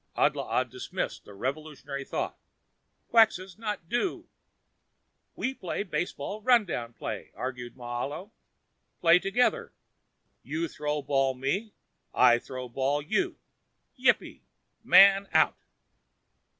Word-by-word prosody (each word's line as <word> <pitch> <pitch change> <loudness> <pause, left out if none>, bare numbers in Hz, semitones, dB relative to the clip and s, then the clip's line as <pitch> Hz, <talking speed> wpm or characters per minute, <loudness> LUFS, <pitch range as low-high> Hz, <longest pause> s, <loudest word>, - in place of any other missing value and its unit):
Adlaa - - +1
dismissed - - -5
the 105 - -12
revolutionary 140 +3 -4
thought. - - -3 0.8
"Quxas 210 -4 +3
not 210 -6 -4
do." 245 - -2 1.1
"We 265 - -2
play 185 -4 -4
baseball 185 +1 -4
run 240 -1 +5
down 120 -9 -4
play," - - -6
argued 125 -2 -5
Moahlo. 130 - -5 0.7
"Play 170 +1 +6
together. 250 - +1 0.7
You 160 +3 -3
throw 150 -1 -3
ball 135 -1 +1
me. 185 - -2 0.4
I 120 -1 +6
throw 130 0 -7
ball 135 +4 -1
you. 365 - 0 0.6
Yippee. - - +1 0.4
Man 195 0 +7
out." - - +3
155 Hz, 105 wpm, -28 LUFS, 135-205 Hz, 1.1 s, Man